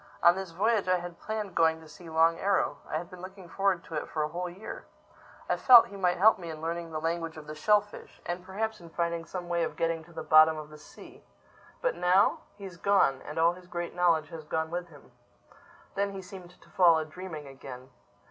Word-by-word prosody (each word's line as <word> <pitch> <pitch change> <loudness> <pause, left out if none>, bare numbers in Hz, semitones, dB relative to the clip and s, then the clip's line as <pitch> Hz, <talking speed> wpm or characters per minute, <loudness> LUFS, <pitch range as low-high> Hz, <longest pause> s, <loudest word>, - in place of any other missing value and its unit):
On 170 - +8
this 190 -1 -5
voyage 205 +4 +1
I 185 0 +3
had 175 -1 -8
planned 215 -3 -4
going 160 -1 +3
to 160 - -14
see 165 +2 -13
Long 165 +1 +3
Arrow. 190 -7 +1
I - - -1
had 170 +2 -7
been 180 -1 -11
looking 190 -1 -10
forward 190 0 0
to - - -12
it 150 - -3
for 155 - -1
a - - 0
whole 175 +3 -4
year. 195 +5 -9 0.6
I - - +1
felt 245 -3 +8
he 200 - -10
might 180 -2 +1
help 210 +3 +5
me 170 -2 -7
in 155 -1 -7
learning 165 +1 -4
the 155 - -3
language 165 0 -3
of 155 - -9
the 155 - -7
shellfish—and 205 -1 -1
perhaps 215 +2 -4
in 170 - -12
finding 170 0 -2
some 180 0 -6
way 170 -1 0
of - - -2
getting 165 -1 -1
to 170 - -17
the 160 -1 -6
bottom 155 0 +6
of 155 0 -8
the 150 - -12
sea. 150 - -15 0.6
But - - +2
now?—He's 190 0 +1
gone! 185 -9 +2
And 150 - -7
all 165 +1 +4
his 180 0 -14
great 175 -1 -5
knowledge 165 -3 +2
has 160 -1 -8
gone 160 +1 -2
with 175 0 -3
him." 145 -6 -17 0.8
Then 200 0 -1
he 190 -1 -7
seemed 180 -2 -12
to - - -21
fall 170 -3 +5
a 160 - -2
dreaming 160 -1 -8
again. 130 -1 -11
170 Hz, 225 wpm, -29 LUFS, 160-190 Hz, 0.8 s, On